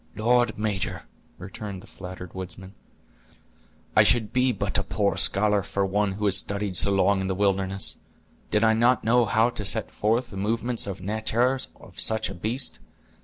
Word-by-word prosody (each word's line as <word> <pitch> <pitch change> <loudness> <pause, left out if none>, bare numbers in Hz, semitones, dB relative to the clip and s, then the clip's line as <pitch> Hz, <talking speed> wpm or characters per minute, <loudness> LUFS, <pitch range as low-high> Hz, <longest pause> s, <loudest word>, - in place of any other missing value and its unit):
"Lord, 120 +1 +2
major," 105 -3 -2 0.3
returned 95 +1 -8
the - - -13
flattered 90 -2 -10
woodsman, 95 +1 -7 1.2
"I - - +7
should 110 -2 +2
be 125 0 +3
but 105 - -2
a - - -1
poor - - 0
scholar 105 0 +4
for 100 +1 -2
one 100 +1 0
who 105 +2 -3
has 100 -2 +4
studied 100 -1 -2
so 95 - +5
long 95 0 +2
in 95 - -2
the 95 - -1
wilderness, 100 +1 0 0.5
did 105 +1 +1
I 110 0 +5
not 120 +3 +3
know 120 +2 +3
how 110 +3 +2
to 105 - -4
set 110 +2 +2
forth 115 +4 0
the 100 - -8
movements 115 +3 -1
or 100 - -3
natur' 110 +6 0 0.2
of - - -13
such 110 0 +1
a - - -6
beast. 115 +9 -2
105 Hz, 175 wpm, -25 LUFS, 95-115 Hz, 1.2 s, I